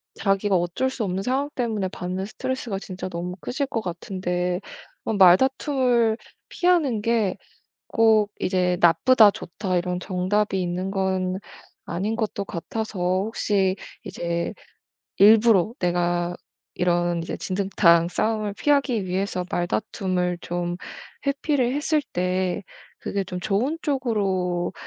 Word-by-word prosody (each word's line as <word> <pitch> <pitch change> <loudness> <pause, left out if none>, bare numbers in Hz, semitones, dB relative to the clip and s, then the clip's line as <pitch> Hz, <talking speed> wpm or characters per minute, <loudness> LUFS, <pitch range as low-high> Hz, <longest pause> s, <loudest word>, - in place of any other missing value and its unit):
자기가 195 0 +1
어쩔 175 +9 0
수 255 -4 -3
없는 190 0 -2
상황 270 +5 0
때문에 220 -6 -1
받는 185 +1 -4
스트레스가 235 0 -4
진짜 185 -1 -6
너무 180 +1 -5
크실 260 - -2
것 235 - -2
같은데 180 -1 -2 0.5
어 - - 0
말다툼을 235 +4 +4 0.3
피하는 325 -11 +2
게 220 -4 +1 0.5
꼭 220 -2 +4
이제 180 -1 +1
"나쁘다." 215 +5 +6
"좋다." 185 0 -3
이런 180 0 -1
정답이 190 +2 0
있는 180 +2 -2
건 190 -1 -1 0.5
아닌 195 +6 -2
것도 215 -3 -2
같아서 205 +3 -5
혹시 190 +1 +1 0.3
이제 170 0 -3 0.6
일부러 215 -1 +6
내가 175 0 0 0.4
이런 175 -1 +1
이제 - - -5
진흙탕 185 -3 +3
싸움을 215 +2 -1
피하기 270 -4 +1
위해서 185 0 -2
말다툼을 180 -1 -1
좀 175 0 -3 0.5
회피를 280 -3 +1
했을 300 +1 +1
때 180 0 0 0.4
그게 200 -1 -2
좀 180 -1 -6
좋은 220 - 0
쪽으로 195 - 0
195 Hz, 255 characters per minute, -24 LUFS, 180-225 Hz, 0.6 s, 나쁘다